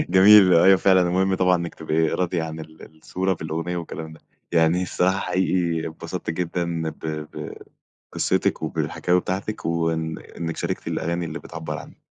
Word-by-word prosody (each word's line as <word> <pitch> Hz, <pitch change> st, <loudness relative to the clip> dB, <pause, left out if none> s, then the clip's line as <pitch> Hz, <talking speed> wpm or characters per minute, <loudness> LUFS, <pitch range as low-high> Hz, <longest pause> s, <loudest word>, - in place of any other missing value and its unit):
جميل 95 Hz, -1 st, +8 dB
أيوه 95 Hz, +3 st, +6 dB
فعلًا 95 Hz, -1 st, +4 dB
المهم 95 Hz, +2 st, +1 dB
طبعًا 90 Hz, -1 st, +3 dB
إنك 85 Hz, -1 st, -4 dB
تبقي 80 Hz, 0 st, 0 dB
راضية 90 Hz, -1 st, -1 dB
عن 80 Hz, 0 st, -6 dB
ال 80 Hz, 0 st, -12 dB
الصورة 95 Hz, +4 st, -1 dB
في -, -, -12 dB
الأغنية 80 Hz, +3 st, -3 dB
والكلام 80 Hz, -1 st, -6 dB
ده، 80 Hz, -, -15 dB, 0.3 s
يعني 85 Hz, +2 st, +3 dB
الصراحة 95 Hz, +2 st, +1 dB
حقيقي 90 Hz, -3 st, 0 dB
اتبسطت 80 Hz, -, -6 dB
جدًا 85 Hz, 0 st, -2 dB
ب -, -, -14 dB
ب 75 Hz, -1 st, -5 dB, 0.6 s
بقصتِك، -, -, 0 dB
وبالحكاوي 90 Hz, +1 st, 0 dB
بتاعتك 95 Hz, +4 st, -4 dB
وإن 80 Hz, -1 st, -1 dB, 0.2 s
إنك 80 Hz, -1 st, -4 dB
شاركتِ -, -, -3 dB
الأغاني 85 Hz, +1 st, -2 dB
اللي 80 Hz, +1 st, -5 dB
بتعبر 80 Hz, -2 st, -6 dB
عنِك. -, -, -12 dB
85 Hz, 160 wpm, -23 LUFS, 80-90 Hz, 0.6 s, جميل